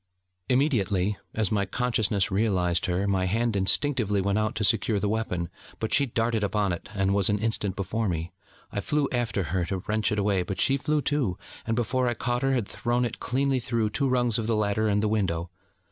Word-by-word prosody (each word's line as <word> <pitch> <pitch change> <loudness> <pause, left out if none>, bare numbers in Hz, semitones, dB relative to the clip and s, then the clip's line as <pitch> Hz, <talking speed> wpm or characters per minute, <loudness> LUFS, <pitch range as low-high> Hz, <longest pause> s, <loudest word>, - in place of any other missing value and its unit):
Immediately, 105 - +2 0.2
as 110 -4 0
my 100 -2 +2
consciousness 110 -4 0
realised 95 -4 +1
her, 90 +2 0
my 95 -2 +1
hand 115 +4 0
instinctively 105 +1 +1
went 100 +2 +1
out 110 +1 -1
to 110 - -1
secure 105 0 +2
the 105 - 0
weapon: 100 -5 -1 0.3
but 110 -1 -2
she 140 -2 +4
darted 115 -2 0
upon 100 -1 +1
it, 85 - -7
and 95 0 +1
was 100 -2 +2
an 105 - +2
instant 105 -2 -1
before 105 +3 -1
me. 85 +1 -3 0.4
I - - -2
flew 145 +5 +1
after 115 -6 0
her 90 -2 +1
to 95 +1 -4
wrench 110 0 +1
it 105 - 0
away, 100 -2 +2
but 90 +1 -4
she 135 - +4
flew, 150 +2 0
too: 135 -11 0 0.3
and 115 - +1
before 125 +2 +1
I 120 - 0
caught 120 +1 -1
her, 135 0 +2
had 120 -6 0
thrown 120 +1 0
it 115 - -4
cleanly 135 +1 0
through 115 -3 -1
two 140 +4 0
rungs 120 -3 +2
of 110 - -2
the 115 - +2
ladder 105 +1 +1
and 105 0 +1
the - - +2
window. 90 -5 -1
105 Hz, 210 wpm, -27 LUFS, 100-120 Hz, 0.4 s, she